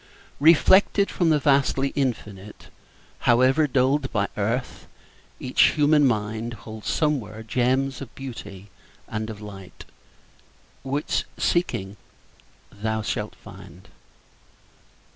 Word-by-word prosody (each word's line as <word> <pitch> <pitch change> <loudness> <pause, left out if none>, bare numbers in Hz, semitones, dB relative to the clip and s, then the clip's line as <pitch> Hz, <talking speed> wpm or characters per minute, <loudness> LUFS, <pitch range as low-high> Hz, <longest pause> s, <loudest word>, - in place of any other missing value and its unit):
Reflected 190 +6 +5
from 175 -3 +1
the 155 - +4
vastly 140 -1 +2
Infinite, 105 -8 -4 0.6
However 130 +6 +4
dulled 135 +1 +1
by 100 -2 0
earth, 115 +5 -3 0.5
each 125 - +3
human 150 -1 +4
mind 110 +1 -2
Holds 110 -1 -8
somewhere 115 -9 -1
gems 130 +4 0
of 135 - -9
beauty 105 -7 -9 0.4
and 110 +1 -4
of 110 -1 -8
light 95 -3 -11 1.0
Which, 140 +3 -2
seeking, 105 - -1 0.7
thou 110 +1 -3
shalt - - -3
find. - - -14
125 Hz, 100 wpm, -24 LUFS, 105-140 Hz, 1.0 s, Reflected